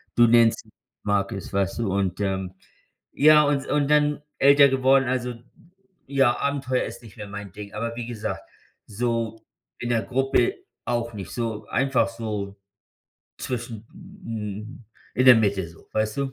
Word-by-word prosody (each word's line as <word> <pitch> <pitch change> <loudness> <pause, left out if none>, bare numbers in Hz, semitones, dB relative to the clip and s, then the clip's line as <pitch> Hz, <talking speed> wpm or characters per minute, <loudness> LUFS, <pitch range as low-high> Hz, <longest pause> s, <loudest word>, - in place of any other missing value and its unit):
du 120 0 +6
nennst 115 -1 +4 0.4
Markus, 100 -1 -1
weißt 100 +2 0
du 100 -5 -1
und, 95 -2 -1
ähm 95 -2 -2 0.6
ja 150 +1 +6
und 145 -2 0
und 145 -1 +1
dann 150 0 +3 0.2
älter 140 +1 +7
geworden, 135 0 +3
also, 125 -1 -1 0.7
ja, 135 -3 +3
Abenteuer 135 -2 0
ist - - -9
nicht 110 -4 -14
mehr 105 - -7
mein 100 -1 -8
Ding. 100 0 -10
Aber 115 +2 -3
wie 120 -1 -5
gesagt, 115 -3 -4 0.4
so 115 0 -2 0.4
in 120 - -4
der 115 -2 +2
Gruppe 135 - +1 0.3
auch 120 -1 -2
nicht 95 -5 -7
so 115 -3 -3
einfach 135 0 +1
so 105 -4 -5 0.8
zwischen 120 -3 -5 0.4
hm, 110 +3 -6 0.3
in 130 - +2
der 125 -2 +10
Mitte 100 -5 +1
so, 85 - -18
weißt 110 0 -1
du? 135 -1 -2
115 Hz, 150 wpm, -24 LUFS, 105-130 Hz, 0.8 s, der